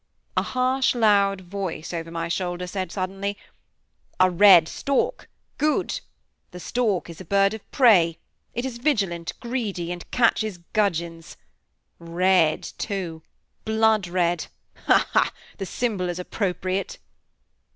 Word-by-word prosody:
A - - +3
harsh, 255 +1 +1
loud 200 -4 +3
voice, 180 -3 -5
over 165 -1 -4
my 165 0 -3
shoulder, 175 +1 -2
said 185 -1 -4
suddenly: 195 +1 -3 0.8
"A 185 0 +5
red 180 -3 +7
stork 280 - -1 0.3
good! 305 0 +1 0.5
The 180 - -10
stork 215 -2 -1
is 170 +1 -10
a - - -7
bird 195 +3 +3
of 220 - -10
prey; 180 - +5 0.4
it 240 +2 -2
is 245 -3 -5
vigilant, 195 - 0
greedy, 215 -8 -3
and 175 -1 -7
catches 220 -5 +1 0.2
gudgeons. 170 -5 -1 0.6
Red, 170 -1 +2 0.2
too! 180 -6 -4 0.4
blood 220 -2 +2
red! 175 -1 0 0.4
Hal - - +5
ha! - - +3 0.3
the 195 - -4
symbol 205 -7 -1
is 175 - -3
appropriate." 185 0 -2
190 Hz, 125 wpm, -24 LUFS, 175-220 Hz, 0.8 s, red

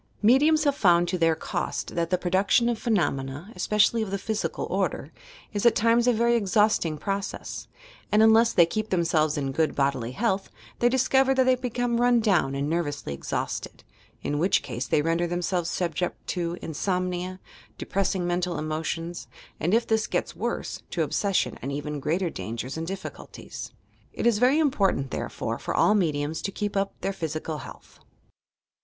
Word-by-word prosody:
Mediums 295 +7 +5
have 285 -2 +3
found 175 -7 +4
to 185 - 0
their 165 -1 +3
cost - - -3
that 170 -1 -1
the 180 - +2
production 190 +6 +2
of 235 -2 -1
phenomena 150 - -1
(especially 210 +5 +2
of 215 - -2
the 200 - -1
physical 215 +2 -3
order) - - -1 0.4
is 205 - -2
at 235 - +5
times 230 +2 +3
a - - +6
very 235 +1 +2
exhausting 210 -6 +2
process, 195 +5 -4 0.4
and 215 +1 +5
unless 225 +1 +6
they 170 - +6
keep 215 +6 -3
themselves 160 -4 +1
in 135 -2 -1
good 155 +3 0
bodily 135 -4 0
health, 195 - -1 0.3
they 240 - +4
discover 265 +1 +3
that 260 - +4
they 255 0 +4
become 245 -1 -1
run 245 -1 +4
down 180 -11 +2
and 140 +1 -1
nervously 145 - -2
exhausted, 70 - -4 0.4
in 145 - -1
which 185 +4 +2
case 125 -1 -4
they 150 - +2
render 165 +2 +1
themselves 175 0 -1
subject 180 0 -2
to 175 -1 -2
insomnia, 180 +2 -2 0.4
de - - -6
pressing 190 -2 0
mental 175 -1 -1
emotions, 160 +2 -3 0.3
and, 170 - 0
if 230 +2 +3
this 220 -1 +1
gets - - -2
worse, - - -3
to - - 0
obsession 200 -2 0
and 135 - -4
even 145 +1 -4
greater 165 +5 -1
dangers 120 +4 -5
and 165 0 -4
difSeulties. 190 +1 -7 0.4
It - - -3
is 235 -3 +3
very 255 +5 +4
important, 195 - +1
therefore, - - -3
for - - -3
all 210 - +4
mediums 155 -5 0
to 195 - -3
keep 205 +1 -3
up 195 0 -1
their 195 - -1
physical 155 -2 -4
health. - - -12
185 Hz, 170 wpm, -26 LUFS, 160-220 Hz, 0.4 s, a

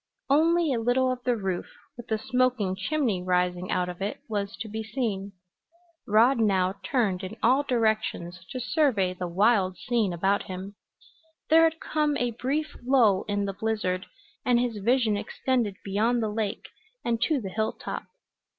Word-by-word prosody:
Only 325 +1 +4
a 235 - 0
little 250 +3 +2
of 250 -1 -5
the 245 -2 +2
roof, 190 -4 -3 0.3
with 240 0 -10
the 220 - 0
smoking 245 -5 +1
chimney 235 -3 0
rising 180 0 0
out 180 0 0
of 180 +1 -7
it, 200 +2 -3
was 205 -2 -3
to 225 - -4
be 220 +1 -4
seen. 215 -4 -3 0.7
Rod 230 +5 +4
now 190 -4 +2
turned 195 -4 0
in 195 +4 -6
all 255 +5 +5
directions 220 -9 -1
to 255 - -5
survey 245 - +1
the 180 0 -4
wild 190 +1 +2
scene 235 -6 0
about 190 +4 +1
him. 190 +2 -6 0.8
There 325 +1 +7
had 325 0 0
come 300 -1 0
a 245 -1 0
brief 280 +7 -2
lull 240 -7 +4
in 205 -1 0
the 195 - -3
blizzard, 205 -3 -2 0.4
and 245 -1 +3
his 240 -3 -1
vision 230 0 +2
extended 235 -1 -1
beyond 225 +4 +1
the 215 - 0
lake 210 -2 -3 0.4
and 230 -1 0
to 305 +1 +2
the 200 -5 -5
hilltop. 220 +3 -3
220 Hz, 165 wpm, -27 LUFS, 195-250 Hz, 0.8 s, There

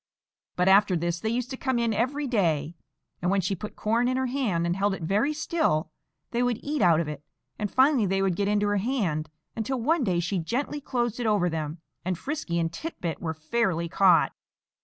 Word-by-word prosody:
But 180 +1 +1
after 195 0 +5
this 170 0 -1
they 220 - -2
used 245 +3 -2
to 260 - -4
come 260 -2 0
in 235 -1 +1
every 260 +7 0
day, 165 - +1 0.5
and 180 - +1
when 195 +1 +2
she 190 +1 0
put 200 +3 -6
corn 230 +3 +1
in 255 +1 +1
her 260 - 0
hand 245 -10 0
and 170 0 0
held 195 +1 +1
it 170 - -8
very 205 - +1
still 300 - 0 0.4
they 240 - 0
would 245 -2 +1
eat 295 0 -1
out 170 -4 +5
of 165 - -1
it; 150 -1 -6 0.4
and 210 -1 -1
finally 260 -5 +4
they 195 +1 +1
would 190 -3 +1
get 200 +2 0
into 205 0 +2
her 205 - +1
hand, 190 - -1 0.3
until 240 +4 -2
one 305 +5 +2
day 180 -6 +1
she 180 +2 -1
gently 265 - -2
closed 240 -4 -1
it 240 - -1
over 195 -5 +2
them, 160 0 -4 0.2
and 185 0 -1
Frisky 280 - -3
and 165 -1 -1
Tit 325 - -6
bit 165 -2 -3
were 160 -1 -3
fairly 170 +1 0
caught. 180 0 +4
205 Hz, 220 wpm, -27 LUFS, 170-245 Hz, 0.5 s, after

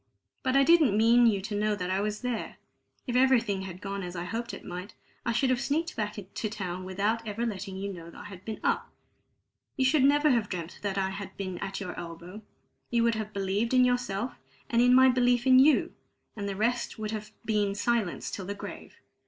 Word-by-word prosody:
But 260 -1 0
I 275 - +6
didn't 300 -9 +5
mean 235 +2 +6
you 200 -4 +2
to 210 +2 -5
know 210 +1 +1
that 185 -2 -3
I 190 +1 +1
was 210 0 -2
there; 250 -3 -3 0.5
if 245 - -3
everything 240 -6 +3
had 185 -1 -8
gone 200 0 -4
as 180 -1 -6
I 170 - -3
hoped 230 +6 -4
it - - -9
might, 180 +4 -7 0.3
I - - +3
should 255 +3 +2
have 250 0 +1
sneaked 325 +6 -1
back 210 -1 -2
to 205 +2 -5
town 185 -3 -5
without 210 +5 -1
ever 220 +3 -2
letting 195 -3 -4
you 200 +1 -4
know 170 -2 -10
I - - -9
had 190 -3 -10
been 220 0 -5
up. - - 0 0.9
You 265 - +2
should 270 +1 +4
never 290 +2 +5
have 230 -4 +1
dreamt 170 -2 -5
that 200 -1 -2
I 190 0 0
had 195 0 -7
been 185 -3 -4
at 195 -1 -4
your 185 -3 -5
elbow; 170 +4 -8 0.5
you 235 -1 +2
would 235 0 +3
have 215 -1 -4
believed 200 +5 0
in 255 0 +6
yourself, 245 -2 -1 0.4
and 235 0 +4
in 245 +1 +6
my 260 0 +8
belief 245 -1 +3
in 260 -1 +7
you, 290 +3 +4 0.4
and 200 -2 -4
the 195 - -3
rest 235 +4 -1
would 215 -1 -4
have 215 -1 -5 0.2
been 210 -3 +1
silence 215 -3 -1
till 190 - -5
the 200 - -3
grave. - - -9
215 Hz, 220 wpm, -28 LUFS, 195-245 Hz, 0.9 s, my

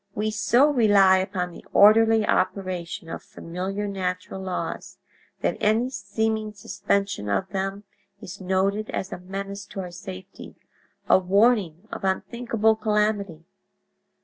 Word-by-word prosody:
We 215 +1 -1
so 220 +5 +4
rely 205 -8 +5
upon 185 -2 -2
the - - -12
orderly 220 +1 +6
operation 185 -3 -1
of - - -6
familiar 190 +4 -5
natural 185 -1 -4
laws 185 -1 -5 0.4
that - - 0
any 225 +4 +2
seeming 220 0 -2
suspension 200 - -2
of 100 -1 0
them 195 +1 -3 0.4
is 190 +2 -9
noted 195 +3 0
as 190 - -4
a - - -6
menace 195 +2 -6
to - - -8
our 180 -2 -5
safety, 95 - -10 0.5
a - - +6
warning 195 -1 +2
of - - -6
unthinkable 220 +3 +1
calamity. 210 -6 -1
195 Hz, 125 wpm, -25 LUFS, 185-215 Hz, 0.5 s, orderly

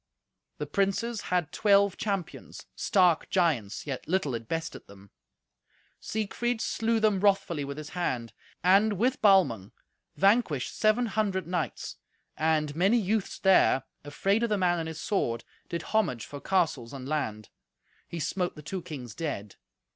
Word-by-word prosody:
The 150 - -3
princes 200 +7 0
had 180 -3 0
twelve 200 -2 +4
champions—stark 185 -2 0
giants, 150 - 0
yet 135 -4 -5
little 170 -6 0
it 115 -1 -5
bested 165 +3 -4
them. 100 0 -16 0.9
Siegfried 225 +2 -2
slew 225 0 0
them 215 -3 +2
wrathfully 195 -6 +2
with 140 +1 -6
his 155 -1 -7
hand, 130 -10 -3 0.3
and, 200 +4 +5
with 245 +7 0
Balmung, 155 - +4 0.4
vanquished 195 - +2
seven 215 +3 +3
hundred 200 -3 -1
knights; 175 -1 -3 0.4
and 155 -2 +1
many 195 +8 +3
youths 215 -1 -1
there, 190 -8 +4 0.2
afraid 195 +9 0
of 235 - +1
the 210 - +1
man 175 -2 +2
and 165 - -3
his 160 -1 -6
sword, 115 - -1 0.3
did 170 -1 -3
homage 170 - 0
for 145 -1 -9
castles 155 -10 0
and 135 -1 -7
land. 110 -9 -3 0.6
He 170 - -6
smote 180 +3 -2
the 150 - -11
two 185 +5 -4
kings 135 -9 -8
dead. 110 - -5
175 Hz, 145 wpm, -28 LUFS, 145-200 Hz, 0.9 s, and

